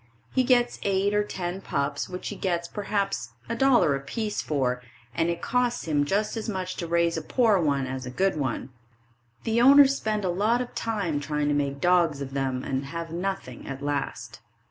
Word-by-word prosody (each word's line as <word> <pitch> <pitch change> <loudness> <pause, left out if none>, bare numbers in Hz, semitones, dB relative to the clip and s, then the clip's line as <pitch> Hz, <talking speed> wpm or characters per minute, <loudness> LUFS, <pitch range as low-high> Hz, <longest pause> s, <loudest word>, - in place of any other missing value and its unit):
He 260 - +3
gets 245 -1 +2
eight 200 +1 +1
or 210 0 +3
ten 185 -2 -4
pups, 140 -4 -2
which 180 0 -5
he 205 - -5
gets 175 -3 -1
perhaps 195 - -2 0.2
$1.00 235 - +4
a - - -2
piece 210 +10 -3
for, 125 -4 -1 0.3
and 165 +7 +1
it 170 0 -3
costs 245 -4 0 0.2
just 205 +8 0
as 225 0 -3
much 185 -2 -3
to 170 - -3
raise 170 0 +2
a - - -2
poor 220 +3 +3
one 140 -5 +1
as 130 0 -5
a - - -4
good 190 +9 +1
one. 135 -3 -2 0.7
The 225 +1 +2
owners 275 +1 +8
spend 215 -5 -1
a - - +1
lot 210 +7 +2
of 250 -1 -4
time 200 -10 -1
trying 150 0 -1
to - - +2
make 140 -1 -1
dogs 170 -3 +3
of 135 -1 -6
them 135 -2 -1
and 135 0 -2
have 165 +3 -5
nothing 180 -8 -4
at 135 0 -6
last. 145 -1 -3
175 Hz, 190 wpm, -26 LUFS, 140-210 Hz, 0.7 s, owners